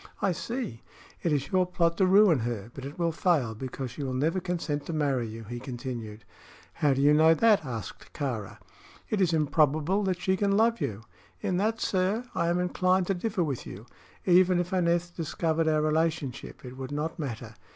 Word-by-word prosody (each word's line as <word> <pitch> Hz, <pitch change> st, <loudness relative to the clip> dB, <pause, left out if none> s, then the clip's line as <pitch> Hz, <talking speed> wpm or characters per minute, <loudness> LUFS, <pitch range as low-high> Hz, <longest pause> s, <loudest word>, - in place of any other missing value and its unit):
"I 195 Hz, -, +1 dB
see. 230 Hz, -, -4 dB, 0.4 s
It 170 Hz, -, 0 dB
is 140 Hz, -2 st, -1 dB
your 185 Hz, -1 st, +3 dB
plot 170 Hz, -2 st, +1 dB
to 190 Hz, -, +4 dB
ruin 190 Hz, -5 st, +6 dB
her; 115 Hz, -2 st, -4 dB
but 135 Hz, -, -8 dB
it 140 Hz, -, -8 dB
will 170 Hz, -1 st, +1 dB
fail, 155 Hz, -9 st, +1 dB
because 130 Hz, +2 st, -6 dB
she 125 Hz, -, -8 dB
will 130 Hz, -2 st, -2 dB
never 160 Hz, +8 st, +1 dB
consent 165 Hz, -5 st, -3 dB
to 170 Hz, -, -3 dB
marry 140 Hz, -6 st, 0 dB
you," 110 Hz, +1 st, -8 dB
he 120 Hz, +3 st, -6 dB
continued. 120 Hz, -4 st, -6 dB, 0.5 s
"How 145 Hz, -3 st, +2 dB
do 135 Hz, -, +1 dB
you 145 Hz, +1 st, +6 dB
know 160 Hz, +2 st, +6 dB
that?" 220 Hz, 0 st, +4 dB
asked 115 Hz, -8 st, -7 dB
Kāra. 115 Hz, -7 st, -4 dB, 0.5 s
"It 210 Hz, -3 st, +1 dB
is 180 Hz, -3 st, +3 dB
improbable 155 Hz, +4 st, +2 dB
that 185 Hz, -2 st, 0 dB
she 190 Hz, +1 st, +1 dB
can 200 Hz, 0 st, +2 dB
love 230 Hz, +1 st, +3 dB
you." 110 Hz, +1 st, -3 dB, 0.4 s
"In 180 Hz, -, 0 dB
that, 220 Hz, +4 st, 0 dB
sir, 190 Hz, +5 st, 0 dB
I 170 Hz, -, 0 dB
am 170 Hz, +1 st, +2 dB
inclined 185 Hz, +1 st, +2 dB
to 195 Hz, -, 0 dB
differ 195 Hz, 0 st, -1 dB
with 140 Hz, -6 st, -4 dB
you. 100 Hz, +4 st, -9 dB, 0.4 s
Even 180 Hz, 0 st, +5 dB
if 175 Hz, +1 st, -2 dB
Aneth 175 Hz, -1 st, +1 dB
discovered 165 Hz, 0 st, -1 dB
our 155 Hz, -1 st, +2 dB
relationship, 155 Hz, -5 st, -1 dB
it 125 Hz, +1 st, -9 dB
would 130 Hz, +1 st, -6 dB
not 155 Hz, +4 st, -3 dB
matter. 120 Hz, -6 st, -5 dB
160 Hz, 195 wpm, -28 LUFS, 130-180 Hz, 0.5 s, ruin